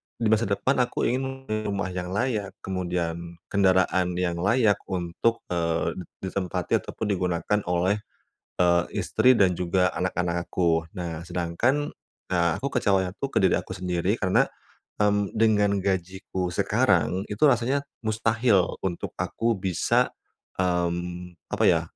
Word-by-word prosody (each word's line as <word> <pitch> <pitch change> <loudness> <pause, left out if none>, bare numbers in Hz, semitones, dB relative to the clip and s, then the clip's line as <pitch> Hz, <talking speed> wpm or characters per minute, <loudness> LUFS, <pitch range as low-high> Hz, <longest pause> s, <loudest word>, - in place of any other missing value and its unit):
di 110 -2 0
masa 110 0 +3
depan 100 +7 +1
aku 125 - 0
ingin 135 +2 -1 0.2
rumah 100 -2 -2
yang 90 -1 -4
layak, 105 -3 -1
kemudian 85 -2 -3 0.2
kendaraan 95 -2 +3
yang 85 -1 -1
layak 105 +1 +3
untuk, 95 +6 -1
eee, 85 +1 0
di - - -5 0.3
ditempati 90 -2 -1
ataupun 105 -2 -4
digunakan 90 +2 0
oleh, 90 +3 +2 0.6
eee, 85 -1 +4 0.2
istri 130 - +4
dan 95 -4 +4
juga 90 +1 +2
anak-anak 90 -1 -1
aku. 85 -2 +1
Nah, 85 -2 -5
sedangkan, 90 - 0 0.4
ah, 85 -2 +2
aku 140 - -1
kecewanya 95 -3 +2
tuh 140 - -1
ke - - +3
diri 95 - +4
aku 95 - -7
sendiri 90 +2 0
karena, 95 -2 +3 0.5
mmm, 105 -1 +2
dengan 105 -2 +3
gajiku 95 -1 -2
sekarang 90 +2 +2
itu 105 - -2
rasanya 135 +2 +2 0.2
mustahil 110 -2 +2
untuk 90 -3 -3
aku 115 0 -1
bisa, 95 -2 +1 0.5
mmm, 90 0 -1 0.2
apa - - -1
ya, - - +4
95 Hz, 135 wpm, -26 LUFS, 90-105 Hz, 0.6 s, eee